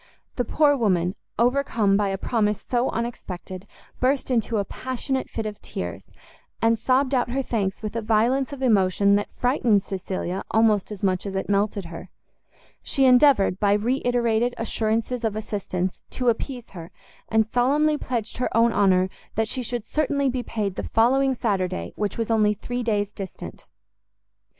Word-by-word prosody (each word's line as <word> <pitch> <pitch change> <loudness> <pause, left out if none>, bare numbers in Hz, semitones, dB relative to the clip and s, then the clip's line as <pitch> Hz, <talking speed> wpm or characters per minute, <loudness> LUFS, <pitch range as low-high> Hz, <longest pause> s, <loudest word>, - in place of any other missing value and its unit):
The 245 - 0
poor 295 -2 +3
woman, 185 -7 +1 0.2
overcome 235 -4 +2
by 205 0 +2
a 195 0 -2
promise 210 -1 -1
so 245 +1 +1
unexpected, 190 -5 -5 0.3
burst 265 +1 +1
into 230 -2 +1
a 200 - 0
passionate 260 +3 -3
fit 225 - -4
of 210 -1 -6
tears, - - -6 0.5
and 225 0 +2
sobbed 260 +3 +2
out 245 -2 +1
her 270 +2 -1
thanks 205 -4 -2
with 215 +1 -4
a 230 - -1
violence 235 +5 +1
of 275 -2 -6
emotion 200 -3 +3
that 205 - -3
frightened 240 -5 +2
Cecilia 190 -1 -4
almost 220 -2 +2
as 205 -2 -8
much 185 0 0
as 195 - -5
it 190 - -2
melted 200 -1 0
her. 170 +2 -9 0.7
She 270 - +1
endeavoured, 250 -7 +5
by 200 -1 +3
re 235 +6 0
iterated 240 -1 +1
assurances 225 +2 -1
of 220 -2 0
assistance, 195 -4 -3
to 250 -2 0
appease 245 +1 -3
her, 170 -2 -9 0.4
and 220 -1 +3
solemnly 280 +7 +2
pledged 235 -3 -3
her 250 - -1
own 230 0 +4
honour 185 -2 +3 0.3
that 220 0 +1
she 255 - -2
should 240 -2 -3
certainly 280 -1 0
be 250 0 -2
paid 205 -5 -3
the - - -3
following 265 +4 +3
Saturday, 190 -6 -2
which 205 -2 -2
was 230 0 -2
only 210 -2 +3
three 245 +4 -4
days 210 -3 -1
distant. 195 -2 -8
225 Hz, 165 wpm, -24 LUFS, 200-250 Hz, 0.7 s, endeavoured